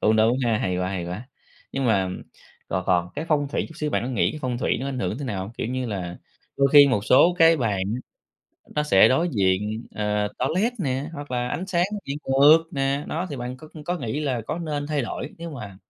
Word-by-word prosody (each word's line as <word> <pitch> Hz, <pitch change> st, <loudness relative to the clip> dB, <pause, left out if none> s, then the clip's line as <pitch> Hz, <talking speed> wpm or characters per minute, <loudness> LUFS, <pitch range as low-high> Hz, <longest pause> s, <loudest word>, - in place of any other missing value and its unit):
cũng 110 Hz, +1 st, +3 dB
đúng 115 Hz, +3 st, +3 dB
ha. 115 Hz, -2 st, +2 dB
Hay 90 Hz, -3 st, -1 dB
quá, 90 Hz, 0 st, -1 dB
hay 95 Hz, -2 st, -3 dB
quá. 100 Hz, +9 st, -6 dB, 0.4 s
Nhưng 135 Hz, -1 st, -1 dB
mà, 95 Hz, -5 st, +2 dB, 0.6 s
còn 90 Hz, 0 st, -2 dB
còn 85 Hz, -1 st, +2 dB
cái 155 Hz, -, -3 dB
phong 145 Hz, -2 st, +2 dB
thủy -, -, -1 dB
chút 160 Hz, -, -13 dB
xíu, 150 Hz, -3 st, -2 dB
bạn -, -, 0 dB
có 125 Hz, -, -3 dB
nghĩ 125 Hz, -, +1 dB
cái 155 Hz, -, -7 dB
phong 125 Hz, -2 st, -2 dB
thủy -, -, +1 dB
nó 135 Hz, -, -3 dB
ảnh 135 Hz, -2 st, -4 dB
hưởng 95 Hz, +1 st, -2 dB
thế 145 Hz, -, -5 dB
nào 100 Hz, -7 st, -3 dB
hông? 100 Hz, +4 st, -8 dB
Kiểu 115 Hz, -, -4 dB
như 130 Hz, +1 st, -2 dB
là, 90 Hz, -5 st, -4 dB, 0.4 s
đôi 140 Hz, 0 st, +4 dB
khi 145 Hz, -1 st, +9 dB
một 105 Hz, -6 st, 0 dB
số 170 Hz, +9 st, +5 dB
cái 165 Hz, 0 st, +6 dB
bàn 105 Hz, -8 st, 0 dB
á 125 Hz, -, -4 dB, 0.7 s
nó 150 Hz, -, +1 dB
sẽ 95 Hz, -11 st, +6 dB
đối 160 Hz, +7 st, +2 dB
diện, 105 Hz, +2 st, 0 dB
ờ, 105 Hz, 0 st, 0 dB
toilet 185 Hz, -, +1 dB
nè, 135 Hz, -4 st, -1 dB
hoặc 145 Hz, -3 st, -8 dB
là 125 Hz, -1 st, -1 dB
ánh 180 Hz, +9 st, -3 dB
sáng 175 Hz, -2 st, +2 dB, 0.2 s
bị 140 Hz, -, -2 dB
ngược 145 Hz, +4 st, +6 dB
nè. 140 Hz, +1 st, -1 dB
Đó, 170 Hz, +4 st, -2 dB
thì 145 Hz, -, -4 dB
bạn 125 Hz, 0 st, -5 dB
có 155 Hz, +3 st, -13 dB, 0.2 s
có 175 Hz, +3 st, -1 dB
nghĩ 135 Hz, +1 st, -3 dB
là 135 Hz, -5 st, -1 dB
có -, -, -3 dB
nên 150 Hz, -4 st, -3 dB
thay 150 Hz, -2 st, -1 dB
đổi 125 Hz, +4 st, -5 dB
nếu 170 Hz, 0 st, -6 dB
mà 105 Hz, -10 st, -8 dB
130 Hz, 245 wpm, -24 LUFS, 105-150 Hz, 0.7 s, khi